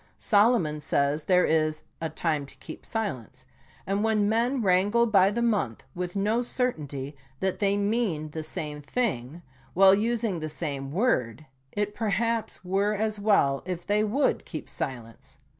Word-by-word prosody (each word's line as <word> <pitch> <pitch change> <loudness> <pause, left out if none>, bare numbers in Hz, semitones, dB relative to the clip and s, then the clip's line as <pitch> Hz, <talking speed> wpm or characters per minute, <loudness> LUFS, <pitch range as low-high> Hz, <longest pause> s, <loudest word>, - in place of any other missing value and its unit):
Solomon 205 -8 +3
says 145 +1 0
there 180 -1 +4
is 155 -1 +1
" - - -42
a 160 - -1
time 155 -2 -1
to - - -14
keep - - -9
silence," 200 - -4 0.4
and 200 +2 0
when 215 -2 +2
men 235 +4 +1
wrangle 200 +5 +3
by 195 -4 +4
the 235 +3 -1
month 200 - 0
with 180 +1 -4
no 210 +4 +1
certainty 150 - -3 0.2
that 190 -1 -1
they 200 -1 +2
mean 200 -8 0
the 160 - -4
same 150 -1 -5
thing, 160 - -2 0.3
while 190 +1 +7
using 220 -2 0
the 155 0 -4
same 140 -4 -4
word, 155 - 0 0.3
it 205 0 -2
per 220 -1 -2
haps 230 -1 -1
were 200 +3 +1
as 215 0 -1
well 195 -10 +3
if 175 -2 -4
they 210 +1 +2
would 240 +7 +1
keep - - -7
silence. 115 -4 -6
195 Hz, 160 wpm, -27 LUFS, 155-215 Hz, 0.4 s, while